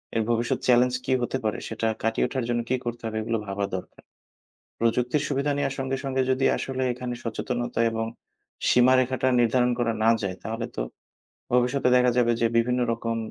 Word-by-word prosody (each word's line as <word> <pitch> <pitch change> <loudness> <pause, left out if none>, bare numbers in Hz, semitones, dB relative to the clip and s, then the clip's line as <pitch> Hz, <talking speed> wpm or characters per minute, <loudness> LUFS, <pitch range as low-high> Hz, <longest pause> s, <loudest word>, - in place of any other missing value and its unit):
এর 110 - +2
ভবিষ্যৎ 115 0 +1
চ্যালেঞ্জ 125 0 +4
কী - - +1
হতে 125 +2 -1
পারে, 110 - 0
সেটা 115 - -2 0.2
কাটিয়ে 115 0 +1
ওঠার 130 -3 -3
জন্য 120 0 +1
কী 130 - +2
করতে 120 0 -4
হবে, 110 0 -4
এগুলো 115 0 -1
ভাবা 100 +1 -1
দরকার। 90 - -8 0.8
প্রযুক্তির 125 +5 +1
সুবিধা 140 +1 0
নেওয়ার 135 -1 -1
সঙ্গে, 135 0 -1
সঙ্গে, 130 -1 0
যদি 130 +1 +1
আসলে 130 -1 -3
এখানে 125 0 -5
সচেতনতা 120 +1 -3
এবং 115 0 -2 0.6
সীমারেখাটা 130 +1 +4
নির্ধারণ 125 +1 +3
করা 115 -1 +1
না 115 - +5
যায়, 95 -2 -2
তাহলে 115 +2 -3
তো - - -2 0.7
ভবিষ্যতে 125 +2 +2
দেখা 125 0 +4
যাবে 120 -1 +4
যে, 115 - +4
বিভিন্ন 125 +2 +1
রকম 115 0 -2
120 Hz, 175 wpm, -25 LUFS, 115-130 Hz, 0.8 s, না